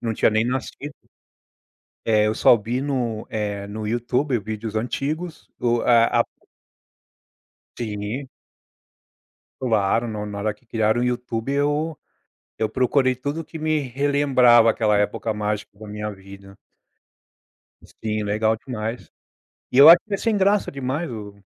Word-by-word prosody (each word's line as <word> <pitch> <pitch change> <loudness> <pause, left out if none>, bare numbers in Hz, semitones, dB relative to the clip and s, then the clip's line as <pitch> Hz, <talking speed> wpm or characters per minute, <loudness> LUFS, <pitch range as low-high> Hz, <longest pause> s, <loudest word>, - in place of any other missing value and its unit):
não 115 -1 -2
tinha - - +3
nem 110 +1 +1
nascido. 135 +3 -4 1.1
É, 105 -1 +3
eu 110 - +1
só 115 - +5
vi 120 +5 -3
no 125 -6 -2
eh, 100 -2 -3
no 105 +1 -6
YouTube, 125 +4 0
vídeos 110 +1 -6
antigos. 150 +9 -3
O 120 -1 +1
a 115 -1 +4
a - - 0 1.6
Sim. 110 +4 -4 1.3
Claro. 115 -1 +1
No 105 -1 -4
na 105 -1 -6
hora 105 +1 -1
que 105 - -31
criaram 110 +1 +1
o - - +1
YouTube, 125 0 -2
eu 145 +3 0 0.6
eu 110 - 0
procurei 130 +2 +2
tudo 145 +6 -4
o - - -10
que 160 +1 -10
me 155 0 +1
relembrava 130 -3 +4
aquela 110 -2 +2
época 105 +2 -1
mágica 105 -1 -4
da 110 - -10
minha 105 0 -5
vida. 100 0 -13 1.5
Sim, 110 -1 -1
legal 110 +2 +1
demais. 115 0 -6 0.6
E 125 - -1
eu 140 +2 +10
acho 170 +1 +10
que 210 - -5
é - - +1
sem 225 +2 0
graça 200 +1 +2
demais 140 +4 -3
o 105 -3 -8
115 Hz, 145 wpm, -22 LUFS, 105-135 Hz, 1.6 s, eu